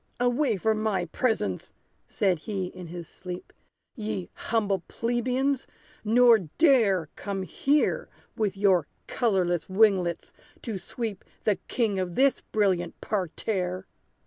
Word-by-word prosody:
"Away 245 -1 +2
from 215 +3 +1
my 200 -5 0
presence!" 175 - -1 0.3
said 185 -5 +1
he, 195 +2 -3
in 180 -1 -9
his 170 0 -7
sleep, 180 -1 -8 0.4
"Ye 210 -5 -4
humble 205 -5 0
plebeians! 250 +3 0 0.4
nor 230 +1 +6 0.2
dare 220 - +4
Come 195 -2 -4
here 280 - +1 0.3
with 205 -4 -1
your 190 -6 +3 0.2
colorless 185 -8 0
winglets 190 -4 +2 0.3
to 220 -6 -3
sweep 215 +1 -5 0.2
The 210 -3 +2
king 215 -6 0
of 180 -2 -3
this 275 0 +3
brilliant 195 -5 0
parterre!" 185 -1 -2
205 Hz, 120 wpm, -27 LUFS, 185-230 Hz, 0.4 s, nor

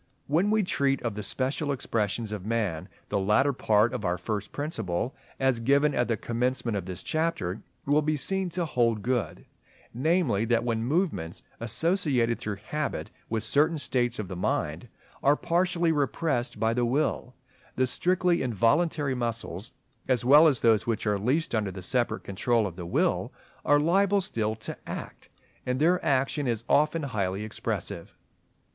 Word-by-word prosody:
When 170 +8 +2
we 215 0 +3
treat 140 -6 +1
of 115 -3 -1
the 105 - -5
special 135 +6 -1
expressions 115 -4 -2
of 105 -3 -5
man, 100 -6 -2 0.2
the 100 - 0
latter 105 +9 +3
part 110 -1 +2
of 120 - -4
our 90 -1 0
first 105 +3 -4
Principle, 120 - -3 0.3
as 135 -3 +2
given 140 +5 +3
at 120 -2 +1
the 115 - 0
commencement 120 0 -1
of 95 -3 -3
this 90 -1 -5
chapter, 155 - -1 0.2
will 145 +2 +3
be 155 0 0
seen 190 +5 -1
to 175 0 -1
hold 115 -7 +1
good; 125 -3 -2 0.5
namely, 135 - +1
that 115 0 +2
when 115 -2 -1
movements, 135 - -1 0.2
associated 125 - +1
through 105 -1 -3
habit 150 +9 -4 0.2
with 110 -1 -1
certain 150 +8 +2
states 125 -4 0
of 105 - -4
the 90 - -6
mind, 90 - -2 0.3
are 145 +1 +4
partially 175 0 +1
repressed 145 -3 -1
by 110 0 +2
the 120 +1 0
will, 125 0 0 0.4
the 130 - +2
strictly 180 +5 +1
involuntary 130 - +1
muscles, 115 -4 -4 0.4
as 125 -2 +1
well 150 +5 +8
as 135 -6 +2
those 115 -2 +3
which 115 -2 -1
are 105 -2 +1
least 130 +10 0
under 110 -3 0
the 95 0 -8
separate 120 0 0
control 110 +3 +1
of 90 -4 -5
the 85 -1 -7
will, - - +1 0.3
are 145 0 +4
liable 195 +6 +3
still 110 - -1
to 105 - -7
act; - - -7 0.3
and 125 +1 -1
their 175 +4 +3
action 135 +1 +1
is 115 -2 -1
often 150 +4 +2
highly 100 -6 -2
expressive. 110 - -5
125 Hz, 165 wpm, -27 LUFS, 110-150 Hz, 0.5 s, well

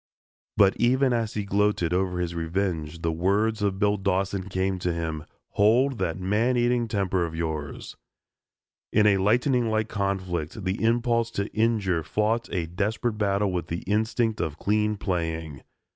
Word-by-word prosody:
But 100 -2 +5
even 130 +2 +3
as 115 -2 -1
he 105 -1 -2
gloated 100 -4 +1
over 90 -1 0
his 85 -1 -2
revenge, 85 -2 -2
the 80 - +1
words 100 +6 +1
of 100 -2 0
Bill 105 0 +2
Dawson 95 0 -1
came 95 0 -1
to 90 0 -1
him, 80 -2 -4 0.2
"Hold 120 +5 +3
that 85 +3 -1
man 110 +7 +1
eating 120 0 +2
temper 95 -4 0
of 80 -1 -4
yours." 80 -3 -4 1.0
In 105 0 +4
a 100 -2 +5
lightning 120 +4 +2
like 110 0 0
conflict, 95 -3 -2
the 95 +4 -1
impulse 115 0 +2
to 100 +1 -2
injure 110 -6 +1
fought 110 +7 -1
a 90 -3 -1
desperate 105 +6 -2
battle 100 -1 +1
with 85 -2 -3
the 85 0 -4
instinct 110 +2 0
of 75 -1 -3
clean 105 +2 0
playing. 80 -6 -3
100 Hz, 160 wpm, -26 LUFS, 90-110 Hz, 1.0 s, But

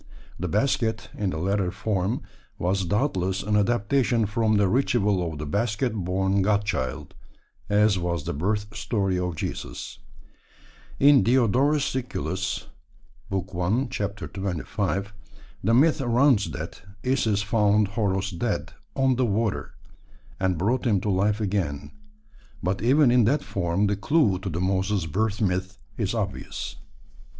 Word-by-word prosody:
The 90 - -2
basket, 110 - 0
in 100 -2 -1
the 80 - -3
latter 95 +2 0
form, 95 +2 -1 0.3
was 95 +2 0
doubtless 95 - 0
an 105 +1 0
adaptation 115 +2 +2
from 110 +1 +1
the 100 -1 +3
ritual 100 -6 +1
of 75 - -7
the 75 - -5
basket 110 - 0
born 95 0 0
God 105 +1 +2
Child, 65 -11 -3 0.6
as 105 -1 +3
was 85 -3 -2
the - - -3
birth 105 +7 -2
story 100 -3 0
of 90 -2 -2
Jesus. - - -5 1.0
In 140 -1 +7
Diodorus 130 +4 +3
Siculus 95 - -3 0.7
(i. 95 -1 +1
25) 100 - -2 0.5
the 110 +4 +2
myth 155 +3 +4
runs 120 -2 +3
that - - -7 0.2
Isis 110 -6 +1
found 105 -2 +2
Horos 100 -2 -1
dead 115 -4 -2 0.2
"on 135 -2 +2
the 130 - +2
water," 110 0 -1 0.6
and 95 -2 +1
brought 115 +9 0
him 105 -4 +3
to 105 - 0
life 100 +3 +1
again; 85 -9 -2 0.7
but 95 +3 -1
even 130 +3 +4
in 125 -2 +5
that 140 +6 +2
form 90 +1 0
the 100 0 +1
clue 100 - +2
to 95 - -4
the 85 0 -3
Moses 95 0 0
birth 105 +6 -1
myth 95 -1 -1 0.2
is 110 -1 -1
obvious. 100 -4 -4
100 Hz, 135 wpm, -25 LUFS, 95-115 Hz, 1.0 s, In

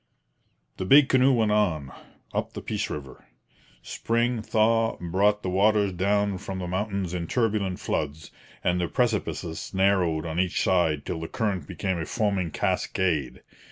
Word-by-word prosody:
The 95 - -3
big 140 +6 +6
canoe 130 +1 +5
went 110 -4 +2
on, 85 -11 +1 0.4
up - - -2
the - - -6
Peace - - -2
river. 70 -3 -7 0.6
Spring 115 0 -1
thaw 115 +1 +2
brought 100 +4 +1
the 95 - -2
waters 100 +1 +3
down 100 +1 +1
from 95 0 -6
the 90 - -4
mountains 95 0 -2
in 85 -2 -3
turbulent 105 -5 0
floods, 75 +1 -3 0.3
and 90 0 +1
the 85 - 0
precipices 105 -8 -2
narrowed 95 -5 +2
on 80 +1 -3
each 90 -1 0
side 80 -6 +1
till 80 - -3
the 80 - -5
current 95 -8 -2
became 95 -3 -2
a 80 - -4
foaming 100 -6 0
cascade. 80 -5 -1
95 Hz, 155 wpm, -26 LUFS, 85-105 Hz, 0.6 s, big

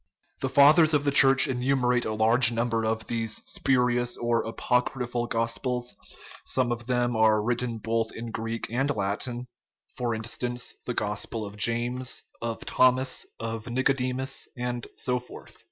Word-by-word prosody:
The 135 - -1
fathers 150 +4 +6
of 145 - +2
the 145 - +2
Church 135 -1 +6
enumerate 125 -1 +1
from 110 0 -2
forty 115 +2 +5
to 115 - +1
fifty 115 -2 0
of 110 0 -1
these 115 -2 -2
spurious 125 -2 +1
or 120 -1 +1
apocryphal 125 +1 -1
gospels; 120 +2 -2 0.5
some 125 -2 0
of 120 0 -4
them 120 -1 +1
are 110 -1 +4
written 120 0 -1
both 115 +1 -1
in 115 0 -7
Greek 115 +1 -4
and 135 +4 0
Latin 120 +5 -3 0.5
for 120 -2 -1
instance, 120 +2 -3
the 125 - -2
gospel 105 +1 -3
of 100 0 -9
James, 120 +4 -2 0.2
of 115 -1 -4
Thomas, 130 0 +2
of 115 0 -5
Nicodemus, 130 +1 -1
and 120 -1 -3
so 125 -1 0
forth. 125 - -13
120 Hz, 150 wpm, -27 LUFS, 115-125 Hz, 0.5 s, fathers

